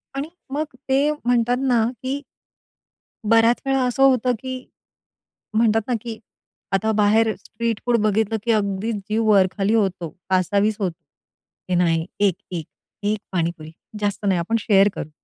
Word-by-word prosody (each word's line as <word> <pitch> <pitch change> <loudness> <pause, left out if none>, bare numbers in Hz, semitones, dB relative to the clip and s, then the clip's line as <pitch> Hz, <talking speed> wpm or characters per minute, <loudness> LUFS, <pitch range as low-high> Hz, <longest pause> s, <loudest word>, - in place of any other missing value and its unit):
आणि 275 +2 -3 0.3
मग 300 +2 0 0.3
ते 265 +1 +4
म्हणतात 245 -4 +1
ना, 240 -3 +3 0.2
की 265 +2 -2 1.1
बऱ्याच 230 +1 +4
वेळा 270 -1 +2
असं 250 +2 +1
होतं, 255 -2 +4
की 260 0 -6 0.9
म्हणतात 225 0 +3
ना, 250 - 0
की 230 -2 -7 0.5
आता 210 +3 +2
बाहेर 215 +1 +3
स्ट्रीट 230 -1 -4
फूड 240 -1 +3
बघितलं, 215 +1 +1
की 235 - +1
अगदी 205 0 0
जीव 215 +2 -2
वर-खाली 195 +1 +3
होतो, 190 -6 0 0.2
कासावीस 200 +3 +2
होतो. 180 -4 -2 0.7
हे 180 - +1
नाही 165 -2 +2
एक, 200 -4 +3 0.2
एक, 170 -4 -4 0.4
एक 210 +1 0
पाणीपुरी. 165 -3 -2 0.3
जास्त 205 0 -2
नाही, 190 -3 +2
आपण 180 +7 -1
शेअर 200 -1 +4
करू. 155 - -5
215 Hz, 145 wpm, -22 LUFS, 195-235 Hz, 1.1 s, ते